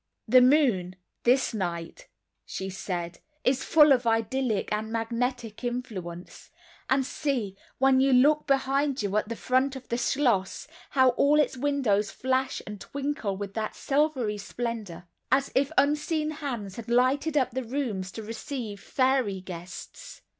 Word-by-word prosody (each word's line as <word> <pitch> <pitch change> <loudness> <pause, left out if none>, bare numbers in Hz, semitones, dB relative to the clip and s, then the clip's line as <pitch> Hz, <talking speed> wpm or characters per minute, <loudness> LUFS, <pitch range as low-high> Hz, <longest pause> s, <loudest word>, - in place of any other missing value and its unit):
"The 250 +3 +7
moon, 250 - +3 0.3
this 255 +1 +3
night," 170 -5 -4 0.4
she 190 0 -5
said, 175 -3 -4 0.2
"is 260 +1 +1
full 300 -2 +6
of 250 -3 +3
idyllic 225 0 0
and 215 +1 -3
magnetic 230 0 -2
influence—and 240 +3 -4
see, 250 -10 -2 0.2
when 265 0 +4
you 270 +1 +4
look 290 +4 +4
behind 275 -1 +1
you 200 0 -2
at 210 0 -1
the 230 - -3
front 260 +3 +1
of 260 -1 -10
the 235 - -1
schloss 240 -6 0 0.2
how 260 -2 +4
all 285 +4 +3
its 300 - +2
windows 250 -7 +1
flash 260 +1 -1
and 205 -1 -8
twinkle 275 -8 -3
with 200 0 -6
that 215 0 -3
silvery 270 -7 0
splendor, 210 -5 -5 0.3
as 270 +1 +2
if 275 +1 +2
unseen 300 +2 +2
hands 245 -11 -5
had 235 0 -7
lighted 265 +6 +2
up 260 - +2
the 260 +2 -3
rooms 225 -7 -3
to 220 - -6
receive 225 -1 -6
fairy 255 -6 +1
guests." 185 - -9
245 Hz, 145 wpm, -27 LUFS, 210-275 Hz, 0.4 s, The